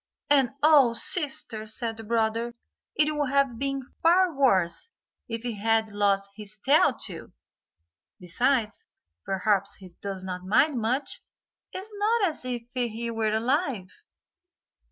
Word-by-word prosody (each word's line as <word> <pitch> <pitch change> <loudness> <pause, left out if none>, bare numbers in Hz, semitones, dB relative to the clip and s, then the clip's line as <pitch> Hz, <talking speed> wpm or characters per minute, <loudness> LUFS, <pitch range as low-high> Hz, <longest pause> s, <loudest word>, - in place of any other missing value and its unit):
"And 270 -4 +5
oh, 290 -6 +6
sister," 270 -6 +1
said 225 +1 -4
the 225 - -9
brother, 230 +1 -1 0.4
"it 305 0 +2
would 290 -2 0
have 275 -4 +1
been 275 -1 -2 0.2
far 350 +1 +4
worse 195 - +2 0.4
if 230 0 -5
he 235 -4 -4
had 225 0 +2
lost 200 -1 +1
his 210 0 -6
tail 280 +5 +4
too. 180 -7 -7 0.9
Besides, 220 +5 0 0.4
perhaps 195 +1 0
he 185 -2 -13
does 195 -2 -5
not 180 -1 -5
mind 250 +8 +2
much; 250 +6 -2 0.5
it - - -6
is 425 +2 -11
not 420 -1 +2
as 305 - -8
if 245 -2 -3
he 235 -2 -2
were 220 -1 0
alive." 235 - 0
230 Hz, 135 wpm, -26 LUFS, 210-275 Hz, 0.9 s, oh